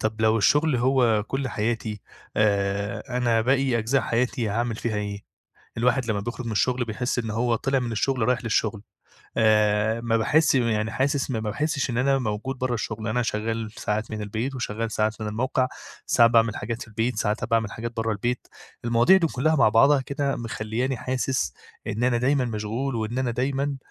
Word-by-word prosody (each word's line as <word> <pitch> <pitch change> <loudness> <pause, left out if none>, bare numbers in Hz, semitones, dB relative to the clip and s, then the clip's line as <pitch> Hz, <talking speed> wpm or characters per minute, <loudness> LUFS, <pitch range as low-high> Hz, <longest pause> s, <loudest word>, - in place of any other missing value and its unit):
طَب 110 0 -2
لو 110 +1 +4
الشغل 150 +5 +3
هو 120 -4 +3
كُلّ 135 0 -2
حياتي، 110 -1 -2 0.4
آآ، 100 +2 0
أنا 115 -2 +2
باقي 130 0 +2
أجزاء 125 +5 +1
حياتي 120 -1 0
هاعمل 115 +2 -1
فيها 110 -2 -2
إيه؟ 100 -1 -3 0.6
الواحد 125 +1 +2
لمّا 100 -1 0
بيخرُج 120 +3 -5
من 115 - -2
الشغل 125 +4 +1
بيحس 120 +3 -2
إن 115 -2 -2
هو 115 +2 +1
طلع 135 +2 0
من 120 -2 -3
الشغل 125 +2 0
رايح 125 -1 +1
للشغل، 110 -2 0 0.5
آآ، 110 0 +3
ما 115 -1 +1
باحس 145 +6 +3
م 125 - +3
يعني 110 -2 0
حاسس 140 0 0
ما 115 -4 -1
باحسش 135 +6 -1
إن 115 - -1
أنا 135 +1 +3
موجود 120 +3 -3
برّه 130 -1 -1
الشغل، 110 0 -4
أنا 125 +3 +1
شغال 110 0 -2
ساعات 110 +1 -2
من 110 -1 -4
البيت 115 +6 -3
وشغال 115 -2 -3
ساعات 110 +1 -1
من 110 - -3
الموقع، 130 +4 0 0.4
ساعات 115 0 +5
باعمل 115 -2 +3
حاجات 115 +2 -4
في - - -11
البيت، 115 +3 -1
ساعات 105 +1 -1
أ 125 - 0
باعمل 115 -3 0
حاجات 115 +1 -5
برّه 115 0 0
البيت، 120 +4 -2 0.4
المواضيع 120 +10 +5
دي 175 -3 +3
كلّها 155 +2 +1
مع 135 - +5
بعضها 135 +6 +5
كده 140 +1 -2
مخلّياني 115 +3 -2
حاسس 130 - -1 0.3
إن 115 +4 -1
أنا 125 -1 +2
دايمًا 130 +2 +2
مشغول 115 +4 -3
وإن 110 +3 -2
أنا 130 -2 0
دايمًا 135 +3 -1
115 Hz, 190 wpm, -25 LUFS, 110-130 Hz, 0.6 s, ساعات